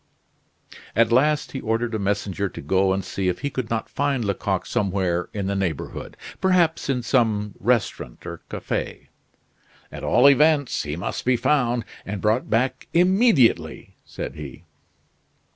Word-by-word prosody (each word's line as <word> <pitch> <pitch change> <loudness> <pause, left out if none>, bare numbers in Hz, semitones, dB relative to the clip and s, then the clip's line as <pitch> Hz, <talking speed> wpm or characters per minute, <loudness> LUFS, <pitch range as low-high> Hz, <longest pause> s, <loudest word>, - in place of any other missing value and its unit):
At 115 +1 +3
last 150 +5 +2
he 135 - -5
ordered 115 +1 -1
a 110 - -1
messenger 100 0 -1
to - - -9
go 95 0 +2
and 95 0 -1
see 95 -1 -2
if 90 - -1
he 140 - -2
could 130 -4 -4
not 115 -1 -2
find 140 -4 -1
Lecoq 100 -2 -1
somewhere 95 -3 -1
in 100 -2 -3
the 100 - -1
neighborhood; 90 -7 -4 0.2
perhaps 175 -6 +2
in 125 -3 0
some 110 -4 +1
restaurant 115 - -1
or 85 -1 -7
cafe. - - -4 0.8
"At - - -8
all 130 - +5
events, 145 0 +4
he 75 0 -4
must 90 +4 -4
be 125 0 +2
found 120 -4 +1 0.2
and 100 0 -5
brought 110 +5 +1
back 125 +4 0
immediately," 180 - +3
said - - -6
he. 75 +1 -9
115 Hz, 150 wpm, -23 LUFS, 95-135 Hz, 0.8 s, all